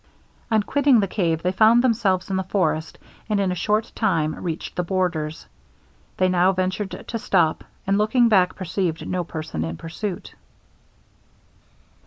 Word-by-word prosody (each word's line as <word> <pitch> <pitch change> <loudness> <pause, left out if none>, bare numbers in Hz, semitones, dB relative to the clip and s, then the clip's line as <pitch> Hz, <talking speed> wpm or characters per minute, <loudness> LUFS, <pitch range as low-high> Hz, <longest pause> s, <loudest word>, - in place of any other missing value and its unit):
On 220 -2 +2
quitting 280 +1 +3
the 200 - +1
cave 165 -4 -1
they 180 - +1
found 220 +5 +5
themselves 200 -7 +1
in - - 0
the 190 - +1
forest, 165 -4 -1 0.3
and 210 -1 +1
in 195 -2 +1
a - - 0
short 210 +5 0
time 165 -8 +1
reached 165 -2 -5
the 180 - 0
borders. 170 -4 -2 0.7
They 185 - +3
now 185 +1 +3
ventured 185 +2 -3
to 230 - -3
stop, 170 -7 +1 0.2
and 195 +1 +1
looking 235 +3 +3
back 185 -5 +3
perceived 180 -2 -3
no 180 -1 -1
person 155 - -5
in 80 0 -4
pursuit. 175 +3 -6
185 Hz, 155 wpm, -23 LUFS, 170-210 Hz, 0.7 s, found